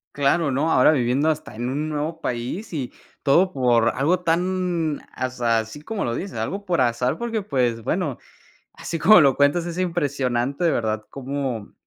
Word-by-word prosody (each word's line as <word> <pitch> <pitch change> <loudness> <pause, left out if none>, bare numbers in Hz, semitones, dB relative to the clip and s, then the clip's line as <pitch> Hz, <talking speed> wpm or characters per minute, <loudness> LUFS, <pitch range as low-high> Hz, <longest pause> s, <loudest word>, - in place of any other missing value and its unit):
Claro, 145 +2 +2
¿no? 145 +5 0
Ahora 130 +2 +5
viviendo 130 +1 +1
hasta 155 -7 -3
en 120 +2 -3
un 150 +3 -2
nuevo 155 +2 -3
país, 125 - -4
y 140 -7 -4 0.3
todo 175 +7 +4
por 120 -5 +3
algo 160 +8 +2
tan, 175 -2 0
aza 125 -3 -1
así 110 +6 -4
como 215 +4 -3
lo 115 - -1
dices, 190 +10 -5
algo 200 +2 -3
por 175 -8 +1
azar, 125 +4 +1
porque 230 -2 -2
pues, 125 - -1
bueno, - - -2 0.5
así 165 - -5
como 195 +3 +7
lo 140 -3 +4
cuentas, 145 +5 +2
es 175 0 -5
impresionante 140 -5 -1
de 165 - +3
verdad, 110 -2 -1
cómo 135 -5 -4
145 Hz, 170 wpm, -23 LUFS, 125-170 Hz, 0.5 s, como